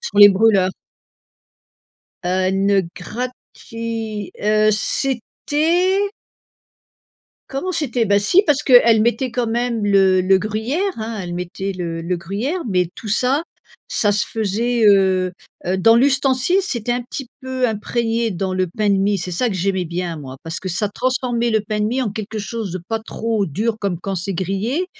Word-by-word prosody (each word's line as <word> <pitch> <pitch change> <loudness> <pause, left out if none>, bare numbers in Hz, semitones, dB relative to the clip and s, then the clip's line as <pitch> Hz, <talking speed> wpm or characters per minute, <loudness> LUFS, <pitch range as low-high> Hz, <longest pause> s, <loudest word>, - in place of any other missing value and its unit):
sur 205 - -4
les 205 0 +11
brûleurs. 195 -2 +3 1.5
Heu, 185 +1 +1
une 195 -1 +2
gratuit, 230 -1 -6
heu, 215 +1 +3
c'était 300 - 0 1.5
comment 275 +7 -3
c'était 260 -9 -1
ben 200 0 +4
si 275 - +4
parce 295 -4 +2
que 265 - +1
elle 225 -1 +5
mettait 240 +3 0
quand 240 0 -1
même 235 -1 -1
le 195 -2 +4
le 190 +1 +4
gruyère, 225 - -2
hein, 225 0 -4
elle 175 -1 -6
mettait 180 +2 -4
le 170 -3 -4
le 180 +2 -1
gruyère, 205 - -3
mais 180 -3 +1
tout 220 - -9
ça, 255 +9 +1 0.4
ça 205 - +1
se 205 +1 +1
faisait, 225 +2 0
heu 190 -3 +4 0.3
heu, 185 +2 0
dans 225 +5 +6
l'ustensile, 270 +5 +3
c'était 245 - -2
un 245 0 -2
petit 250 +1 -7
peu 260 -1 -1
imprégné 225 +1 -1
dans 185 +1 -2
le 185 0 0
pain 205 +4 -1
de - - +4
mie. 200 +1 +2
C'est 180 +1 -4
ça 180 +8 0
que 210 - -3
j'aimais 190 0 0
bien 170 0 -4
moi 135 -3 -8
parce 165 +2 -4
que 190 - -6
ça 185 +4 -1
transformait 245 +1 -1
le 220 -1 +2
pain 210 +1 -3
de - - +1
mie 250 +4 0
en 225 - -2
quelque 215 +1 -5
chose 215 -2 -5
de 185 - -4
pas 225 - -1
trop 220 -2 -2
dur 215 +9 -1
comme 190 -4 -2
quand 195 +1 -3
c'est 185 +3 -3
grillé 195 - -1
215 Hz, 175 wpm, -20 LUFS, 190-240 Hz, 1.5 s, les